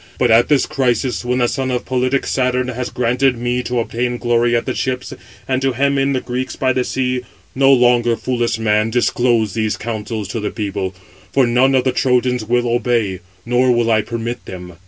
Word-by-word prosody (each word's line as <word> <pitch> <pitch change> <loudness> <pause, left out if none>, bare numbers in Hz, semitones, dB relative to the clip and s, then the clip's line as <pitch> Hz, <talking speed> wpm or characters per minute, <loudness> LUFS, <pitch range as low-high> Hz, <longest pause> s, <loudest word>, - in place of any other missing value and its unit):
But 125 -2 +2
at 115 +2 +5
this 145 -3 +3
crisis, 130 -4 -1
when 125 +1 -1
the 120 -1 +2
son 130 +1 -2
of 125 -1 -2
politic 130 +1 0
Saturn 125 -1 0
has 125 0 -4
granted 125 +1 +1
me 120 +1 -1
to 125 0 -2
obtain 120 +1 -2
glory 120 0 +1
at 115 - 0
the 130 - -2
ships, 130 0 -3 0.3
and 130 0 0
to 135 -1 +1
hem 140 +2 +1
in 135 +1 +1
the 130 - -1
Greeks 125 +1 -4
by 130 -1 +1
the 125 - 0
sea, 125 0 -1 0.3
no 135 +1 +4
longer, 120 -2 +4
foolish 120 -1 -1
man, 110 0 +1
disclose 120 -2 +1
these 110 -2 -1
counsels 110 -2 -4
to 115 - -3
the 105 - -2
people: 100 -3 -4 0.4
for 135 -2 +3
none 125 +3 +3
of 130 - +3
the 130 - +1
Trojans 125 -1 +1
will 120 +2 0
obey; 115 -5 0 0.3
nor 125 +1 +2
will 120 -1 +2
I 110 -1 +3
permit 115 +2 -5
them. 90 -1 -9
125 Hz, 200 wpm, -18 LUFS, 115-130 Hz, 0.4 s, at